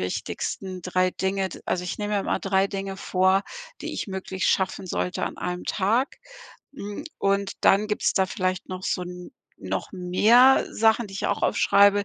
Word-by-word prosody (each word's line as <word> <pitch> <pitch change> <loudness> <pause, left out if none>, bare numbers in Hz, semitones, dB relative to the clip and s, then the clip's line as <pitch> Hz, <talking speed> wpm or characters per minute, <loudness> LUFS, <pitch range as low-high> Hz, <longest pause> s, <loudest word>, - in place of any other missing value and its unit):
wichtigsten 185 - -4
3 185 +1 +1
Dinge.“ 190 0 -1
D - - -9
also, 180 0 -1
ich 180 - -4
nehme 210 0 -2
mir 200 - +2
immer - - -1
3 195 0 +2
Dinge 195 -1 -4
vor, 190 0 +2 0.4
die - - -4
ich - - -4
möglichst 190 -1 -2
schaffen 190 0 0
sollte 180 +1 -2
an - - -5
einem 180 0 -4
Tag, 225 +8 0 0.6
hm, 205 -5 -6
und 200 0 +1
dann 205 +2 +4
gibt's 210 - 0
da 190 - +3
vielleicht 185 -1 -2
noch 185 0 -6
so 180 - -1
'n 180 0 -8 0.3
noch - - -4
mehr 215 +8 +5
Sachen, 225 +1 +2
die 195 - -11
ich - - -2
auch - - -1
aufschreibe. 200 0 +4
195 Hz, 180 wpm, -25 LUFS, 185-205 Hz, 0.6 s, mehr